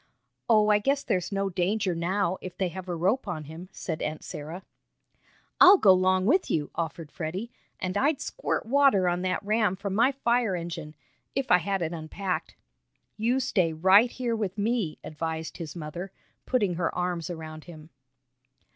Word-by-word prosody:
"Oh, 215 -2 +5
I 210 0 +5
guess 275 +6 0
there's 185 +1 -1
no 195 0 -1
danger 185 +2 0
now, 185 +2 -1
if 185 - -8
they 190 -2 0
have 185 +1 -8
a 175 - -1
rope 195 +9 0
on 165 -4 -4
him," 160 +5 -10
said 160 -4 -5
Aunt 155 0 -3
Sarah. 160 +5 -7 1.0
"I'll 380 +2 +9
go 195 - +6
'long 185 0 +2
with 355 - +3
you," 150 -2 -1
offered 165 -1 -4
Freddie, 185 +8 -5 0.3
"and 185 0 -3
I'd 280 +6 +2
squirt - - -3
water 255 -7 +4
on 175 0 0
that 185 +2 -1
ram 215 -2 +2
from 195 0 -4
my 235 +6 +4
fire 240 -6 +1
engine 165 -3 -6 0.4
if 270 -1 -1
I 180 - +7
had 195 +1 -1
it 165 +1 -3
unpacked." 175 +4 -4 0.6
"You 240 +4 +1
stay 185 -10 +1
right 190 +8 +5
here 240 -1 -2
with 205 -3 -3
me," 210 -6 0
advised 160 +1 -4
his 160 -4 -7
mother, 175 +3 -6 0.4
putting 210 -8 +1
her 165 - +1
arms 180 -1 -2
around 155 -2 -7
him. 155 -2 -12
185 Hz, 175 wpm, -27 LUFS, 170-215 Hz, 1.0 s, I'll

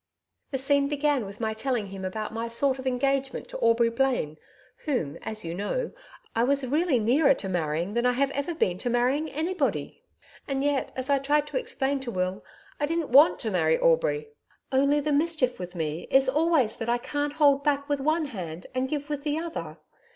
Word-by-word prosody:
The 270 - -2
scene 280 +1 +2
began 290 -5 0
with 200 +1 -10
my 220 -1 -1
telling 220 -2 -2
him 195 0 -7
about 215 +4 -4
my 230 +1 -3
sort 260 +3 0
of 260 - -5
engagement 270 +1 0
to - - -6
Aubrey 230 0 +4
Blaine 235 - 0 0.5
whom 245 - -1
as 215 -4 -5
you 165 - -3
know, 205 - -2 0.4
I 230 - +3
was 280 +1 +2
really 300 +2 +2
nearer 270 +6 +4
to 195 - -5
marrying 170 +1 -1
than 235 +2 +2
I 250 - +3
have 280 +5 -1
been 180 - +1
to 245 - -2
marrying 255 +6 +1
anybody. 315 0 -2 0.5
And 275 -1 -1
yet, 285 -2 0
as 260 +2 -2
I 280 - +4
tried 290 +2 +2
to - - -2
explain 280 - -1
to 265 -2 -6
Will, 185 -2 -2 0.4
I 290 - +1
didn't 330 -1 -1
WANT 285 +6 +7
to - - -2
marry 485 - +2
Aubrey. - - +2 0.4
Only 280 +2 +3
the 300 0 0
mischief 295 - +1
with 180 0 -7
me 160 0 -3
is 270 0 +4
always 300 -4 +2
that 225 - -4
I 240 - +3
can't 290 +4 -3
hold 285 -2 +4
back 285 -1 +1
with 290 -1 0
one 310 +3 +1
hand 175 - -7
and 255 +1 -1
give 290 -2 -3
with 295 -2 -3
the 300 0 -1
other... 335 0 -5
270 Hz, 200 wpm, -27 LUFS, 230-295 Hz, 0.5 s, WANT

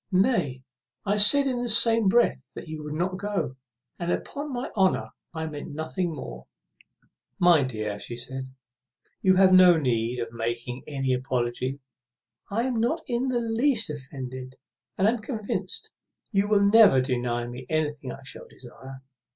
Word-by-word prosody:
Nay, 185 - +1 0.4
I 205 +1 +1
said 275 +8 +5
in 250 -3 -1
the 245 - -2
same 230 -1 +6
breath 235 +5 +2
you 155 -2 -7
would 150 0 -5
not 185 +3 -1
go; 205 -10 -2 0.4
and, 175 0 -2
upon 290 +8 -4
my 250 0 -4
honour, 190 -3 +1 0.2
I 160 -1 -4
meant 150 -2 -7
nothing 165 +3 -2
more." 65 - -8 0.9
"My 175 -4 +5
dear," 110 -5 -3
said 120 - -6
she, 130 +2 -5 0.8
"you 185 -1 +4
have 190 0 +5
no 180 -2 +8
need 120 -4 0
of 115 -1 -4
making 120 +2 -4
any 135 -3 -1
apology. 125 +1 -2 0.7
I 225 +4 0
am 250 -2 -1
not 245 +9 0
in 245 +1 -1
the 250 -2 0
least 230 - +1
offended, 130 -2 -8 0.4
and 190 - +3
am 235 +2 +1
convinced 215 -2 -4 0.4
you 200 -1 +2
will 205 -1 +3
never 205 -8 +7
deny 120 -2 -1
me 125 +1 -8
what 150 -4 -2
I - - -16
shall 135 - -8
desire." 130 +2 -12
160 Hz, 155 wpm, -26 LUFS, 130-210 Hz, 0.9 s, no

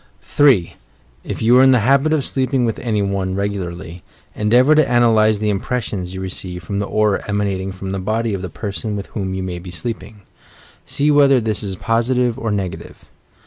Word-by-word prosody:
3. 130 -13 +3 0.5
If - - -5
you 120 +2 +5
are - - +7
in 130 0 +6
the 125 - +3
habit 140 +4 +3
of 150 -4 +1
sleeping 130 -1 0
with 115 - -2
any 110 -4 -1
one 95 -1 -2
regularly, 90 -4 -4 0.3
endeavour 120 +7 +4
to 155 -5 +3
analyse 110 -3 +4
the 105 0 0
impressions 100 -3 -3
you 95 - -5
receive 90 -1 -6
from 100 +3 -3
the 100 - -2
aura 105 -2 +1
emanating 100 -2 -2
from 95 0 -6
the 95 - -3
body 110 +3 -1
of 95 - -3
the 90 - -5
person 105 +2 -5
with 100 -1 -5
whom 95 -3 -3
you 95 - -3
may 90 -2 -5
be 90 +1 -10
sleeping. 110 +2 -7 0.7
See 145 +1 +1
whether 140 -2 +5
this 110 -3 -2
is 100 -3 -3
positive 120 +3 0
or 115 - -2
negative. 100 -3 -5
105 Hz, 190 wpm, -19 LUFS, 95-120 Hz, 0.7 s, are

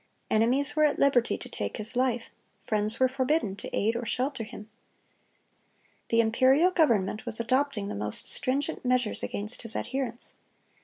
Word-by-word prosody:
Enemies 255 +7 +2
were 305 - +3
at 300 -1 +3
liberty 260 -4 +3
to - - -7
take - - -4
his 215 +1 -4
life; 245 -2 +1 0.4
friends 215 0 0
were 260 - +5
forbidden 260 -4 0
to - - -7
aid 225 +3 0
or 235 - -3
shelter 255 +1 -2
him. 210 -1 -10 1.4
The 230 0 +4
imperial 260 +10 +4
government 220 - +1
was 225 - +2
adopting 245 -2 0
the - - -4
most 105 +1 -3
stringent 275 +2 -1
measures 250 -3 +1
against 210 +4 -3
his 230 -2 0
adherents. 260 -3 -3
245 Hz, 155 wpm, -28 LUFS, 220-270 Hz, 1.4 s, were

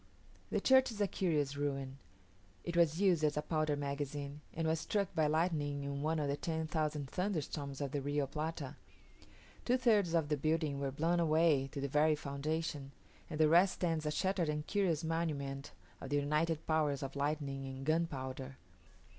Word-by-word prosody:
The - - +1
church 260 0 +5
is 215 - -8
a 205 - +3
curious 150 -8 0
ruin; 140 -2 -3 0.6
it 175 - -4
was 170 -1 +3
used 180 -6 +3
as 150 -1 +2
a 150 - 0
powder 155 -2 0
magazine, 145 0 -4
and 165 0 -2
was 160 0 +1
struck 200 +2 -1
by 155 -1 +2
lightning 150 -3 0
in 140 0 -3
one 160 +2 0
of 150 -2 0
the 140 - 0
ten 160 +1 -2
thousand 155 -3 -1
thunderstorms 150 -5 -3
of 140 -2 -2
the 145 - -1
Rio 145 +1 0
Plata. 155 +4 -4 0.9
Two 250 +1 +3
thirds 210 -9 +3
of 160 -3 +1
the 150 - +1
building 155 -1 0
were 140 -1 -1
blown 165 +5 +1
away 155 -4 +3
to - - -5
the 140 - -1
very 150 +2 +3
foundation; 145 0 -3 0.4
and 155 -2 -5
the 155 - +6
rest 175 +4 +5
stands 165 -3 -1
a - - +2
shattered 180 +1 0
and 150 0 -2
curious 175 -6 +1
monument 145 -4 -2 0.3
of 135 - -6
the 145 - 0
united 150 +2 0
powers 150 -3 +1
of 135 0 -5
lightning 140 -1 -2
and 135 0 -6
gunpowder. 135 -4 -2
150 Hz, 180 wpm, -35 LUFS, 140-165 Hz, 0.9 s, the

